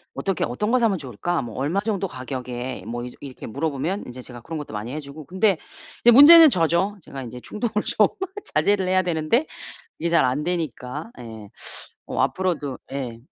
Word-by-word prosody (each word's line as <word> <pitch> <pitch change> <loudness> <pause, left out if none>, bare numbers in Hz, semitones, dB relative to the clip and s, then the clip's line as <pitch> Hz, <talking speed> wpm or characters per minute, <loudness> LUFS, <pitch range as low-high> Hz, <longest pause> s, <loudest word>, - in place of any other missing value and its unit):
"어떻게 195 -3 -1
어떤 210 - -2
것 255 - +4
사면 225 -5 +2
좋을까? 145 +5 -2
뭐 115 -2 -8
얼마 150 +9 0
정도 200 -3 -1
가격에?" 130 -2 -5
뭐 120 +1 -4
이렇 125 - -7
이렇게 135 -3 -9
물어보면 150 - -2
인제 125 +1 -8
제가 120 -1 -10
그런 160 +7 -6
것도 150 -6 -7
많이 105 +3 -4
해 155 - -3
주고 145 +1 -10
근데 190 +4 +2 0.4
이제 240 - +6
문제는 310 +6 +10
저죠. 180 - +1
제가 135 - -8
인제 125 0 -8
충동을 215 - -2
좀 210 - +4 0.5
자제를 190 +5 +2
해야 185 0 +3
되는데 170 - +1 0.5
이게 170 - -1
잘 170 - +4
안되니까. 150 - -3
예. 110 -3 -9 0.6
어 - - -2
앞으로도 170 -8 -1
예. 125 -4 -4
155 Hz, 365 characters per minute, -23 LUFS, 125-195 Hz, 0.6 s, 문제는